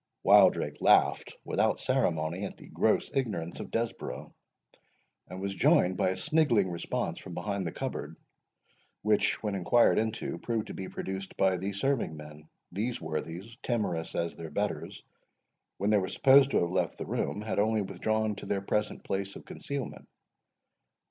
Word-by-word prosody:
Wildrake -, -, +5 dB
laughed -, -, +4 dB
without -, -, +1 dB
ceremony 80 Hz, +3 st, 0 dB
at 100 Hz, -, -5 dB
the -, -, -13 dB
gross -, -, +1 dB
ignorance 105 Hz, -11 st, -2 dB
of -, -, -6 dB
Desborough, 95 Hz, -, -4 dB, 0.9 s
and 90 Hz, +1 st, -8 dB
was 100 Hz, 0 st, -3 dB
joined 90 Hz, -1 st, +4 dB
by 90 Hz, -, +2 dB
a 95 Hz, -, -2 dB
sniggling 115 Hz, -, +2 dB
response 85 Hz, -, -3 dB
from -, -, -9 dB
behind 100 Hz, -3 st, -2 dB
the -, -, -3 dB
cupboard, -, -, -5 dB, 0.9 s
which, 105 Hz, 0 st, +2 dB
when 105 Hz, -2 st, -1 dB
inquired 100 Hz, +5 st, +4 dB
into, 110 Hz, -5 st, -2 dB
proved 115 Hz, +2 st, -2 dB
to -, -, -7 dB
be 95 Hz, -, -6 dB
produced 95 Hz, 0 st, -6 dB
by 95 Hz, -1 st, +3 dB
the 95 Hz, +3 st, -3 dB
serving 100 Hz, -, -1 dB
men. 75 Hz, 0 st, -12 dB, 0.2 s
These 110 Hz, +7 st, -2 dB
worthies, 80 Hz, +7 st, -5 dB
timorous 90 Hz, -9 st, -2 dB
as 85 Hz, 0 st, -1 dB
their 80 Hz, -1 st, -7 dB
betters, 75 Hz, -, -3 dB, 0.7 s
when 100 Hz, +2 st, +1 dB
they 105 Hz, -, +5 dB
were 95 Hz, -, -2 dB
supposed 135 Hz, 0 st, +6 dB
to -, -, +2 dB
have 85 Hz, 0 st, 0 dB
left 90 Hz, -3 st, 0 dB
the -, -, -5 dB
room, 105 Hz, -, -2 dB
had 110 Hz, -, -1 dB
only 110 Hz, 0 st, +2 dB
withdrawn 110 Hz, +3 st, -1 dB
to -, -, -8 dB
their 100 Hz, -, 0 dB
present 105 Hz, +2 st, -1 dB
place 100 Hz, 0 st, -3 dB
of -, -, -10 dB
concealment. 140 Hz, -3 st, -6 dB
100 Hz, 160 wpm, -30 LUFS, 85-110 Hz, 0.9 s, supposed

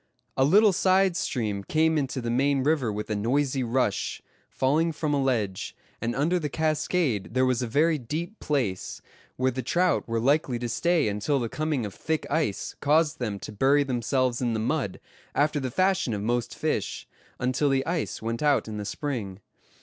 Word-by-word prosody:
A 130 Hz, -, +3 dB
little 200 Hz, +8 st, +5 dB
side 190 Hz, 0 st, +3 dB
stream 105 Hz, -, -2 dB
came 160 Hz, +7 st, +2 dB
into 135 Hz, -3 st, -1 dB
the 115 Hz, 0 st, -2 dB
main 135 Hz, +2 st, +2 dB
river 145 Hz, -6 st, +1 dB
with 105 Hz, +1 st, -4 dB
a -, -, +1 dB
noisy 130 Hz, +5 st, 0 dB
rush, 120 Hz, -3 st, 0 dB, 0.3 s
falling 155 Hz, +5 st, +1 dB
from 150 Hz, -1 st, -1 dB
a 140 Hz, -, +2 dB
ledge; 110 Hz, -8 st, -1 dB, 0.3 s
and 115 Hz, +1 st, -1 dB
under 165 Hz, +7 st, +1 dB
the 150 Hz, -3 st, -3 dB
cascade 150 Hz, -, 0 dB
there 130 Hz, 0 st, +4 dB
was 130 Hz, -2 st, +1 dB
a 125 Hz, -, -1 dB
very 155 Hz, +6 st, +2 dB
deep 165 Hz, -, -5 dB
place, 125 Hz, -11 st, -2 dB, 0.3 s
where 130 Hz, +1 st, +1 dB
the 130 Hz, +1 st, -3 dB
trout 175 Hz, +8 st, +1 dB
were 115 Hz, 0 st, -1 dB
likely 135 Hz, 0 st, +2 dB
to 120 Hz, 0 st, -3 dB
stay 165 Hz, +4 st, +1 dB
until 105 Hz, +7 st, 0 dB
the 120 Hz, -2 st, -2 dB
coming 150 Hz, -5 st, -1 dB
of 100 Hz, -, -6 dB
thick 160 Hz, -1 st, -2 dB
ice 150 Hz, -12 st, -1 dB
caused 155 Hz, +1 st, +2 dB
them 110 Hz, -5 st, -2 dB
to -, -, -7 dB
bury 135 Hz, +7 st, +3 dB
themselves 125 Hz, -1 st, 0 dB
in 120 Hz, -2 st, 0 dB
the 110 Hz, -, -1 dB
mud, 125 Hz, -3 st, -1 dB, 0.4 s
after 145 Hz, +1 st, +2 dB
the 130 Hz, -2 st, -2 dB
fashion 185 Hz, -, +1 dB
of 100 Hz, -, -4 dB
most 120 Hz, +1 st, -1 dB
fish, -, -, -2 dB, 0.3 s
until 130 Hz, +4 st, +1 dB
the 135 Hz, -1 st, +1 dB
ice 165 Hz, -8 st, -2 dB
went 115 Hz, +1 st, -2 dB
out 145 Hz, -5 st, +2 dB
in 110 Hz, -1 st, -5 dB
the 105 Hz, -, -4 dB
spring. 105 Hz, -5 st, -4 dB
135 Hz, 190 wpm, -26 LUFS, 115-155 Hz, 0.4 s, little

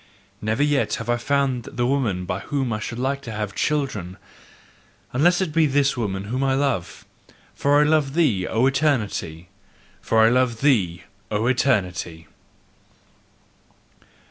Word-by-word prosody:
Never 110 Hz, +6 st, 0 dB
yet 145 Hz, -2 st, +1 dB
have 120 Hz, -, -3 dB
I 120 Hz, -, +1 dB
found 135 Hz, -1 st, 0 dB
the 120 Hz, -, -2 dB
woman 120 Hz, -9 st, 0 dB
by 90 Hz, +2 st, -3 dB
whom 135 Hz, +2 st, -2 dB
I 105 Hz, -, -2 dB
should 115 Hz, +2 st, -5 dB
like 135 Hz, +2 st, -1 dB
to 120 Hz, -, -8 dB
have 105 Hz, -2 st, -4 dB
children, 130 Hz, -, -2 dB, 1.0 s
unless 175 Hz, +8 st, +3 dB
it 170 Hz, -5 st, -2 dB
be 160 Hz, -1 st, +4 dB
this 140 Hz, 0 st, +2 dB
woman 100 Hz, -5 st, -3 dB
whom 125 Hz, +6 st, -2 dB
I 135 Hz, -1 st, +2 dB
love: 135 Hz, -11 st, -2 dB, 0.5 s
for 145 Hz, +1 st, +2 dB
I -, -, +5 dB
love 150 Hz, -2 st, +1 dB
thee, 120 Hz, -, +2 dB
O 115 Hz, +3 st, +1 dB
Eternity! 110 Hz, -, -1 dB, 0.5 s
FOR 110 Hz, 0 st, +3 dB
I -, -, +5 dB
LOVE 120 Hz, -2 st, +1 dB
THEE, 95 Hz, -, +2 dB, 0.3 s
O 105 Hz, +1 st, -1 dB
ETERNITY! 95 Hz, -10 st, 0 dB
125 Hz, 145 wpm, -23 LUFS, 105-140 Hz, 1.0 s, I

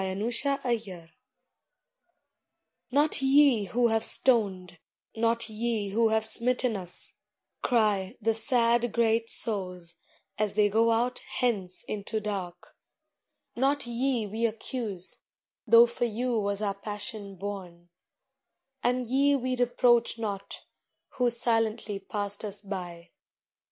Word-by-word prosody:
ARRAIGNMENT 225 Hz, -, -2 dB, 1.8 s
"Not 290 Hz, +3 st, +3 dB
ye 270 Hz, -5 st, +4 dB
who 235 Hz, +5 st, +1 dB
have 225 Hz, 0 st, +1 dB
stoned, 190 Hz, -11 st, +1 dB, 0.4 s
not 230 Hz, 0 st, 0 dB
ye 220 Hz, -2 st, -2 dB
who 225 Hz, +3 st, +2 dB
have 220 Hz, 0 st, +2 dB
smitten 240 Hz, +1 st, +1 dB
us," 180 Hz, -2 st, -7 dB, 0.5 s
cry 210 Hz, -6 st, +1 dB
The 225 Hz, 0 st, +1 dB
sad, 235 Hz, 0 st, +3 dB
great 230 Hz, -1 st, +1 dB
souls, 180 Hz, -6 st, +2 dB, 0.5 s
as 210 Hz, -2 st, -1 dB
they 210 Hz, -1 st, +3 dB
go 225 Hz, +3 st, +2 dB
out 240 Hz, +2 st, 0 dB
hence 200 Hz, -7 st, -2 dB
into 215 Hz, +1 st, -4 dB
dark, 190 Hz, -4 st, -6 dB, 0.8 s
"Not 275 Hz, +3 st, +1 dB
ye 240 Hz, -1 st, -1 dB
we 220 Hz, +3 st, -1 dB
accuse, 215 Hz, -4 st, -5 dB, 0.5 s
though 230 Hz, +2 st, +8 dB
for 240 Hz, 0 st, -1 dB
you 235 Hz, +1 st, -1 dB
was 200 Hz, 0 st, -1 dB
our 200 Hz, -1 st, 0 dB
passion 205 Hz, 0 st, -6 dB
borne; 180 Hz, -3 st, -8 dB, 0.9 s
And 250 Hz, +1 st, 0 dB
ye 275 Hz, +4 st, +2 dB
we 255 Hz, -1 st, -1 dB
reproach 240 Hz, -1 st, +2 dB
not, 200 Hz, -3 st, -5 dB, 0.5 s
who 245 Hz, -1 st, 0 dB
silently 225 Hz, -3 st, 0 dB
passed 205 Hz, +1 st, -4 dB
us 205 Hz, 0 st, -4 dB
by. 180 Hz, -4 st, -7 dB
225 Hz, 115 wpm, -28 LUFS, 200-240 Hz, 1.8 s, though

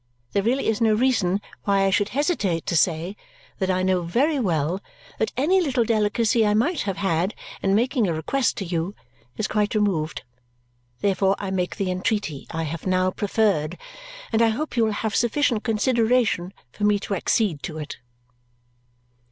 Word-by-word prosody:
There 200 Hz, -, +1 dB
really 245 Hz, +6 st, 0 dB
is 220 Hz, 0 st, 0 dB
no 220 Hz, -2 st, +4 dB
reason 210 Hz, -6 st, +2 dB, 0.2 s
why 200 Hz, -1 st, +3 dB
I 195 Hz, -, +2 dB
should 205 Hz, +2 st, +2 dB
hesitate 215 Hz, -, 0 dB
to -, -, -1 dB
say 170 Hz, +3 st, +1 dB, 0.4 s
that 190 Hz, -, 0 dB
I 185 Hz, 0 st, +1 dB
know 185 Hz, -1 st, +2 dB
very 270 Hz, -, +1 dB
well 175 Hz, -, 0 dB, 0.4 s
that 220 Hz, -, 0 dB
any 360 Hz, +8 st, +3 dB
little 265 Hz, -7 st, +1 dB
delicacy 225 Hz, +1 st, +2 dB
I 210 Hz, -1 st, +2 dB
might 295 Hz, +9 st, +1 dB
have 190 Hz, -, -3 dB
had 190 Hz, 0 st, 0 dB, 0.3 s
in 195 Hz, 0 st, +2 dB
making 240 Hz, 0 st, +2 dB
a 170 Hz, -, 0 dB
request 245 Hz, -, 0 dB
to 195 Hz, -, -3 dB
you 170 Hz, +3 st, -2 dB, 0.4 s
is 215 Hz, -, -1 dB
quite 210 Hz, 0 st, 0 dB
removed. 185 Hz, -7 st, 0 dB, 0.8 s
Therefore 195 Hz, -1 st, +2 dB
I 195 Hz, -2 st, -4 dB
make 180 Hz, -2 st, -1 dB
the 195 Hz, -3 st, -1 dB
entreaty 185 Hz, -6 st, -2 dB
I 165 Hz, 0 st, -3 dB
have 160 Hz, +3 st, -5 dB
now 185 Hz, 0 st, +2 dB
preferred, 195 Hz, -6 st, 0 dB, 0.6 s
and 225 Hz, -, +3 dB
I 230 Hz, -, +5 dB
hope 280 Hz, +7 st, -3 dB
you 230 Hz, -2 st, +3 dB
will 220 Hz, -, 0 dB
have 215 Hz, +1 st, -2 dB
sufficient 240 Hz, -2 st, +1 dB
consideration 230 Hz, -4 st, +1 dB, 0.2 s
for 210 Hz, -, -7 dB
me 210 Hz, 0 st, +4 dB
to 205 Hz, -, -3 dB
accede 190 Hz, -4 st, +1 dB
to 155 Hz, +1 st, -6 dB
it." 150 Hz, -2 st, -6 dB
205 Hz, 175 wpm, -24 LUFS, 180-230 Hz, 0.8 s, I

